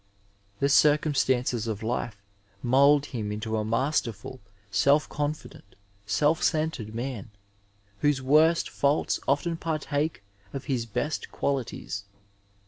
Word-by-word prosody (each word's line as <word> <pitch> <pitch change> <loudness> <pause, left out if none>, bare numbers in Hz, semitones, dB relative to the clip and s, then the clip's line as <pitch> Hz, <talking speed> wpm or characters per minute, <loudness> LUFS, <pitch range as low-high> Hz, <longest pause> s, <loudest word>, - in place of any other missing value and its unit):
The 140 - +2
circumstances 135 -5 +3
of 110 -1 -3
life 115 -1 -2 0.5
mould 140 +3 +5
him 110 -7 -4
into 110 +1 -3
a 110 - 0
masterful, 115 0 -1 0.3
self 140 +9 +3
confident, 145 -8 -5 0.3
self 150 +6 +2
centered 155 -9 -1
man, 120 -3 -4 0.7
whose 145 -2 +2
worst 155 +5 +4
faults 140 +2 +1
often 160 +5 +1
partake 155 -4 -2 0.3
of 135 - -5
his 125 -5 -1
best 150 +8 -3
qualities. 125 -7 -3
135 Hz, 110 wpm, -27 LUFS, 115-150 Hz, 0.7 s, mould